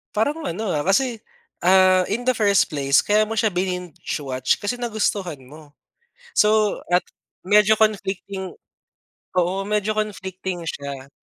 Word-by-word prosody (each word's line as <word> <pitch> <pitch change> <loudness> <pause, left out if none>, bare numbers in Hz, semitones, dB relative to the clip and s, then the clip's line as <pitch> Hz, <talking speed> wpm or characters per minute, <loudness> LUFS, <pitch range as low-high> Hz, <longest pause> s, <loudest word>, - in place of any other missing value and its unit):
Parang 290 +10 0
ano, 215 - -3
ah, 150 - 0
kasi, 225 - +1 0.4
ah, 185 +1 +5
in 235 +4 -2
the 255 - +3
first 205 -3 +3
place 140 -1 +3
kaya 215 +1 +3
mo 225 - -4
siya 215 -2 +1
bininge-watch 175 -7 -2
kasi 205 +2 -2
nagustuhan 205 - -1
mo. 145 +1 -15 0.7
So, 215 -1 +3
at 180 +1 +4 0.4
medyo 210 +3 +5
conflicting 200 -3 -1 0.8
oo. 180 +1 +2
Medyo 210 0 0
conflicting 190 -4 -4
siya 140 -3 -6
195 Hz, 130 wpm, -22 LUFS, 175-215 Hz, 0.8 s, ah